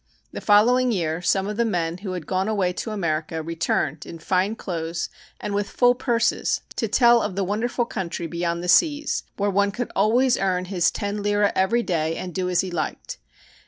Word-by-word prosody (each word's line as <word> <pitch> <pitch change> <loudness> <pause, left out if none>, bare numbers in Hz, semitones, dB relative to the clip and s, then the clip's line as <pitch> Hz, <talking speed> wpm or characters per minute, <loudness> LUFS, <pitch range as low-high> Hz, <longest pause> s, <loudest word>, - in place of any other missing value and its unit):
The - - -6
following 245 +4 +4
year 165 -5 -1
some 190 +2 +1
of 210 0 -4
the 235 - +3
men 175 -6 -1
who 190 -1 -5
had 175 -4 -5
gone 190 +1 -1
away 195 -4 0
to 200 - -5
America 160 -5 -2
returned 160 -2 -1
in 165 - -9
fine 185 +5 0
clothes 170 -4 -4 0.3
and 205 - -4
with 205 0 -1
full 245 0 +4
purses 235 -2 0 0.2
to 225 - 0
tell 235 +2 +5
of 190 - -3
the 200 - 0
wonderful 225 +5 -1
country 175 -5 -4
beyond 170 +1 -2
the - - -4
seas, 295 - +3 0.2
where 205 0 +1
one 200 +1 +2
could 235 +5 -4
always 240 +6 +3
earn 185 -1 0
his 180 -2 +1
ten 205 0 -3
lire 205 0 +2
every 215 +6 +2
day 165 -4 -1
and 180 -1 -6
do 180 +1 -1
as 180 - +2
he 185 - -5
liked. 160 -3 -4
195 Hz, 195 wpm, -23 LUFS, 175-220 Hz, 0.3 s, tell